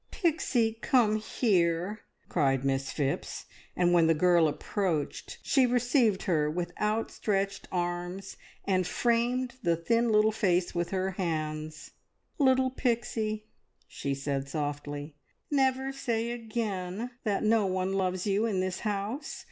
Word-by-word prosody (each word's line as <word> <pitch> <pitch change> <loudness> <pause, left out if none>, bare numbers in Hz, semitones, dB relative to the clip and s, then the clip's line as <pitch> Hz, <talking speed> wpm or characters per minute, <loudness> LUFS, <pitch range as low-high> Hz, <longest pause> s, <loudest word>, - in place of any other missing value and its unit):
"Pixie, 265 - +1
come 220 -5 +3
here!" 195 -3 +1 0.3
cried 135 -5 +1
Miss 135 0 0
Phipps; 140 -2 -2 0.3
and 175 -1 +3
when 170 -2 +5
the 165 - +4
girl 175 0 +4
approached 160 0 -2
she 265 -3 +4
received 240 -4 +2
her 155 -5 +1
with 175 +2 -3
outstretched 210 -2 -1
arms 175 +2 -3 0.3
and 185 -2 +1
framed 240 +4 0
the 170 -6 +2
thin 230 +7 +1
little 215 0 +5
face 185 -5 +1
with 175 -1 -1
her 190 0 -1
hands. 155 -4 -3 0.5
"Little 260 -2 +4
Pixie," 225 -4 -1 0.4
she 140 -1 -3
said 140 0 -3
softly, 145 0 -4 0.3
"never 265 -1 +2
say 235 -3 -1
again 220 -2 -3
that 205 -4 0
no 215 -2 +3
one 185 0 -1
loves 185 -1 0
you 205 +2 +2
in 200 -4 0
this 185 0 -1
house. 220 - -3
195 Hz, 130 wpm, -29 LUFS, 170-230 Hz, 0.5 s, when